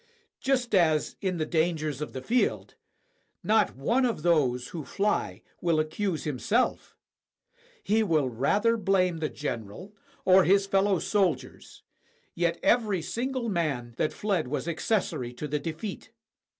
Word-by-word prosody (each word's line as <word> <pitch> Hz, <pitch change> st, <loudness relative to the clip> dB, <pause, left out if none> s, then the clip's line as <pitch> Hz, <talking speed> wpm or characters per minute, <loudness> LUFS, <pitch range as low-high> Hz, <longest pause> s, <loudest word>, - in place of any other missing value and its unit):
Just 255 Hz, -3 st, 0 dB
as, 160 Hz, -5 st, +3 dB
in 185 Hz, -2 st, -1 dB
the 155 Hz, -, -1 dB
dangers 155 Hz, -3 st, -1 dB
of 150 Hz, -, -4 dB
the 130 Hz, -, -7 dB
field, 245 Hz, +2 st, 0 dB, 0.7 s
not 215 Hz, -, +2 dB
one 230 Hz, -, +1 dB
of 230 Hz, -11 st, -1 dB
those 130 Hz, -8 st, +2 dB
who 165 Hz, -3 st, -6 dB
fly 195 Hz, -, -1 dB, 0.2 s
will 165 Hz, -3 st, +2 dB
accuse 155 Hz, +1 st, -2 dB
himself; 155 Hz, -, -1 dB, 0.9 s
he 220 Hz, +2 st, +2 dB
will 160 Hz, -9 st, +2 dB
rather 200 Hz, -, +1 dB
blame 185 Hz, -4 st, +1 dB
the 155 Hz, -1 st, -1 dB
general 125 Hz, -, -6 dB, 0.3 s
or 190 Hz, 0 st, +7 dB
his 195 Hz, +2 st, +4 dB
fellow 195 Hz, 0 st, +2 dB
soldiers; 185 Hz, -3 st, -2 dB, 0.5 s
yet 170 Hz, -1 st, 0 dB
every 210 Hz, -8 st, +2 dB
single 255 Hz, +3 st, -2 dB
man 150 Hz, -, -2 dB
that -, -, +1 dB
fled 195 Hz, -9 st, -1 dB
was 150 Hz, +5 st, -3 dB
accessory 165 Hz, -, -1 dB
to 150 Hz, +5 st, -5 dB
the 150 Hz, +1 st, -1 dB
defeat. 165 Hz, +8 st, -6 dB
175 Hz, 135 wpm, -27 LUFS, 150-205 Hz, 0.9 s, or